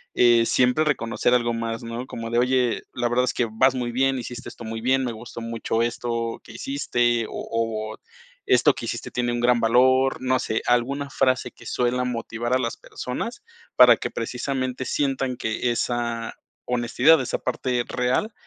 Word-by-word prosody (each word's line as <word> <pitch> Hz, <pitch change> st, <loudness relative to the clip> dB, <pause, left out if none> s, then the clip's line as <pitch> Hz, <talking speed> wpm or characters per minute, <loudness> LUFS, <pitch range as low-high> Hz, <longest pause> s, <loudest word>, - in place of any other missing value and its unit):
eh, 120 Hz, -1 st, +5 dB
siempre 125 Hz, +7 st, +3 dB
reconocer 120 Hz, -3 st, +1 dB
algo 120 Hz, -1 st, +2 dB
más, 115 Hz, +1 st, -3 dB
¿no? 115 Hz, +2 st, -5 dB
Como 115 Hz, 0 st, -6 dB
de, 120 Hz, -, +2 dB
oye, 125 Hz, -1 st, +1 dB
la 120 Hz, -1 st, -1 dB
verdad 125 Hz, +1 st, +2 dB
es -, -, -1 dB
que 120 Hz, -, +1 dB
vas 130 Hz, +4 st, +3 dB
muy 120 Hz, -1 st, -2 dB
bien, 135 Hz, +1 st, +1 dB
hiciste 125 Hz, +1 st, -7 dB
esto 120 Hz, -, -11 dB
muy 115 Hz, 0 st, -4 dB
bien, 130 Hz, +2 st, +2 dB
me 120 Hz, -, -2 dB
gustó 115 Hz, +1 st, -9 dB
mucho 115 Hz, 0 st, -2 dB
esto 115 Hz, -1 st, -2 dB
que 110 Hz, -, -12 dB
hiciste, 120 Hz, -3 st, 0 dB
o -, -, -12 dB, 0.2 s
o 110 Hz, -1 st, -2 dB, 0.5 s
esto -, -, +4 dB
que -, -, -6 dB
hiciste -, -, -4 dB
tiene 120 Hz, -1 st, -1 dB
un 120 Hz, -, -2 dB
gran 120 Hz, -1 st, +3 dB
valor, 130 Hz, +3 st, +3 dB
no 130 Hz, 0 st, +2 dB
sé, 110 Hz, -, -1 dB
alguna 135 Hz, +4 st, +1 dB
frase 130 Hz, -1 st, +1 dB
que -, -, -17 dB
suela 125 Hz, +1 st, 0 dB
motivar 120 Hz, -1 st, -3 dB
a 130 Hz, -, +3 dB
las 115 Hz, -2 st, -2 dB
personas. 230 Hz, -, -6 dB, 0.4 s
Para 125 Hz, -2 st, +9 dB
que -, -, -4 dB
precisamente 130 Hz, +2 st, -3 dB
sientan 135 Hz, -3 st, -1 dB
que 115 Hz, +2 st, -1 dB
esa 120 Hz, -1 st, -2 dB, 0.3 s
honestidad, 125 Hz, +5 st, +3 dB
esa 130 Hz, -, -2 dB
parte 125 Hz, -2 st, -1 dB
real, 125 Hz, -, 0 dB
120 Hz, 180 wpm, -24 LUFS, 115-130 Hz, 0.5 s, Para